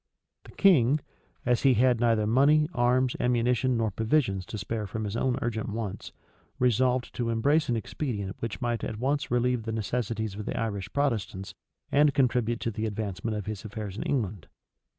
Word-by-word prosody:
The - - -12
king, 150 -8 +4 0.5
as 125 -1 +2
he 135 -2 +5
had 125 +1 +3
neither 115 -3 +2
money, 140 +7 +4
arms, 125 0 +2
ammunition, 125 +1 +2
nor 110 -2 0
provisions 110 - 0
to - - -5
spare 105 +1 -3
from 110 +3 -4
his 105 0 -3
own 125 +1 +1
urgent 110 -3 -2
wants, 105 -2 -5 0.5
resolved 125 +1 +2
to 120 -2 -2
embrace 145 +7 +2
an 120 - +2
expedient 105 -3 -3
which 115 +2 -4
might 120 -2 -1
at 110 - -3
once 140 +4 -1
relieve 125 0 +1
the 110 0 -4
necessities 110 0 -2
of 105 +1 -7
the - - -2
Irish 100 -5 -3
Protestants, 110 -9 -1 0.4
and 145 0 +4
contribute 120 -3 +2
to 115 - -1
the 110 +1 -2
advancement 105 0 -3
of 105 - -5
his 105 -2 -5
affairs 105 -2 -6
in - - -4
England. 105 - -2
115 Hz, 175 wpm, -28 LUFS, 105-125 Hz, 0.5 s, he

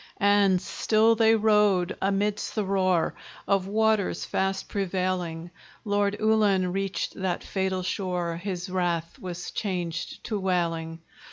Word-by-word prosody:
And 200 -2 +4
still 220 +4 +2
they 225 0 +4
rowed 210 -4 +3
amidst 200 +2 0
the 215 -2 0
roar 185 -3 +1 0.3
Of 195 -2 +1
waters 220 -1 +1
fast 190 0 -1
prevailing: 180 -3 -2 0.3
Lord 205 0 +1
Ullin 205 -4 +2
reached 195 0 -2
that 190 -2 -2
fatal 190 -1 -2
shore; 180 -3 -2
His 180 0 -4
wrath 175 -3 -2
was 175 -1 -6
changed 175 -4 -4
to 215 -3 -2
wailing. 165 -3 -1
190 Hz, 120 wpm, -26 LUFS, 180-205 Hz, 0.3 s, And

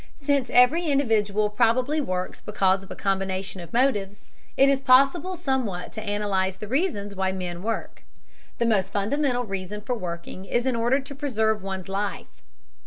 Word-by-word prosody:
Since 280 -3 +1
every 290 +8 +4
individual 215 -7 +2
probably 250 +7 +2
works 185 -7 -3
because 195 -2 +1
of 195 - -14
a - - -6
combination 190 -1 -2
of 170 -1 -11
motives, 210 -6 0 0.3
it 275 - +6
is 275 -1 +2
possible 275 +8 +4
somewhat 260 - -2
to 220 - -6
analyze 205 -3 -1
the 210 - -7
reasons 220 - -1
why 190 0 0
men 180 -2 -5
work. 225 +3 -4 0.6
The 235 - +1
most 195 -4 +1
fundamental 245 +5 0
reason 195 -1 -5
for 225 +4 -2
working 180 -2 -6
is 240 +5 0
in 260 -2 +1
order 240 +4 +2
to 270 +1 -9
preserve 220 -7 0
one's 190 -1 -5
life. 195 - -4
215 Hz, 165 wpm, -25 LUFS, 195-260 Hz, 0.6 s, it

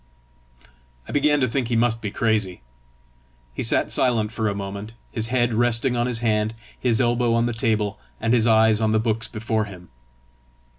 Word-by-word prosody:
I - - -7
began 145 0 +2
to 130 - +3
think 125 +1 -1
he 120 - -1
must 115 0 +1
be 105 - -3
crazy. 105 - -1 0.9
He - - -4
sat - - +2
silent 115 -4 +1
for 110 -1 -1
a 100 - -3
moment, 100 +3 -6 0.2
his 110 0 -2
head 120 -1 +1
resting 120 +2 +2
on 120 0 0
his 120 -2 0
hand, 110 -1 0 0.2
his 120 -3 +1
elbow 120 -1 +2
on 115 0 +2
the 120 - -1
table, 110 -2 -1 0.2
and 115 +1 0
his 120 -1 +3
eyes 110 -1 +4
on 110 -1 +1
the 110 - +3
books 115 0 -1
before 110 -1 -2
him. 90 -3 -12
115 Hz, 185 wpm, -23 LUFS, 110-120 Hz, 0.9 s, eyes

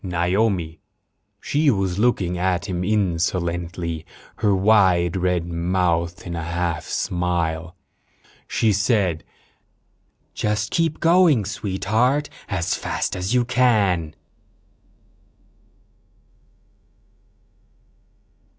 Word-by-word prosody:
Naomi. 90 -2 0 0.6
She 150 +6 +1
was 95 -5 0
looking 100 -7 +1
at 90 +1 0
him 90 -3 -3
insolently, 85 -4 -1 0.3
her 105 -3 +2
wide 95 -3 +3
red 90 -2 0
mouth 85 0 -1
in 85 -1 -5
a 85 - -4
half 85 -1 -2
smile. 85 -2 -2 0.7
She 110 -2 +1
said: 100 -6 +1 1.1
"Just 105 0 -1
keep 165 -3 0
going, 165 - +4
Sweetheart, 110 +8 0 0.2
as 90 -4 -1
fast - - -2
as 90 +6 -2
you 125 -1 +3
can." 105 -10 +2
90 Hz, 85 wpm, -22 LUFS, 85-110 Hz, 1.1 s, going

